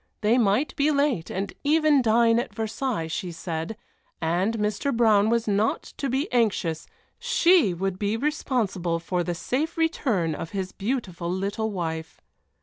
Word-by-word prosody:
They 220 +4 +3
might 225 +6 +1
be 290 +2 +2
late 280 - +1
and 195 +1 -3
even 305 -1 +4
dine 230 0 +4
at 240 - -5
Versailles, 225 -3 -2
she 175 +3 -4
said, 165 +4 -5 0.4
and 180 +7 0
Mr. 210 +6 -1
Brown 220 -3 +4
was 235 -1 +1
not 210 +2 +1
to 275 - -2
be 270 +6 0
anxious 205 -9 0 0.3
she 370 - +4
would 190 +1 -2
be 210 +2 0
responsible 225 - -1
for 175 +1 -2
the 175 0 -3
safe 295 - -2
return 240 - +1
of 160 - -5
his 190 -1 -3
beautiful 195 -7 -3
little 200 +4 -2
wife. 160 -5 -4
215 Hz, 150 wpm, -25 LUFS, 180-260 Hz, 0.4 s, even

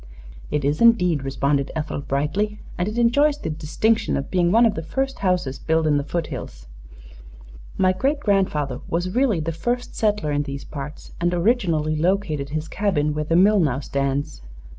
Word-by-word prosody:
"It 150 -2 -1
is, 145 +6 0
indeed," 180 -10 +4
responded 140 +1 0
Ethel, 150 -2 -3
brightly, 155 +11 -1 0.2
"and 175 - -1
it 215 +2 -4
enjoys 285 +5 +3
the 160 - -4
distinction 210 +9 0
of 140 - -5
being 175 -2 +2
one 230 +4 +5
of 225 - +3
the 180 - -4
first 270 +11 -3
houses 180 -8 0
built 160 0 +1
in 150 -2 +3
the 145 - -1
foothills. 140 - -5 1.1
My 185 0 +3
great 275 +10 0
grandfather 155 - 0
was 175 +2 -1
really 245 -7 +2
the 160 +1 -2
first 240 +10 -3
settler 210 -8 0
in 145 0 +1
these 140 -1 -6
parts 150 +1 -8
and 175 0 +2
originally 170 -6 +1
located 160 -4 0
his 155 +1 -3
cabin 160 -8 0
where 150 0 -2
the 165 - +1
mill 200 +4 +5
now 140 -7 +1
stands. 140 - -2
165 Hz, 175 wpm, -22 LUFS, 145-210 Hz, 1.1 s, one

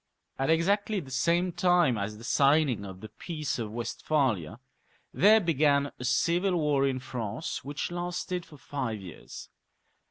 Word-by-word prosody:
At 135 - 0
exactly 200 +6 +2
the 135 -7 -10
same 170 +7 +1
time 175 -7 +3
as 105 +1 -4
the 115 - -12
signing 140 -4 +3
of 95 -1 -9
the 110 - -8
Peace 155 +4 -4
of 110 -2 -4
Westphalia 115 - -1 0.5
there 215 +3 +6
began 145 -5 +2
a - - -6
civil 175 +8 +2
war 145 -3 +2
in 130 -1 -1
France, 125 +1 -5
which 145 +4 -4
lasted 175 0 -3
for 150 - -15
five 130 -6 -4
years. 90 -4 -10
145 Hz, 150 wpm, -28 LUFS, 120-175 Hz, 0.5 s, there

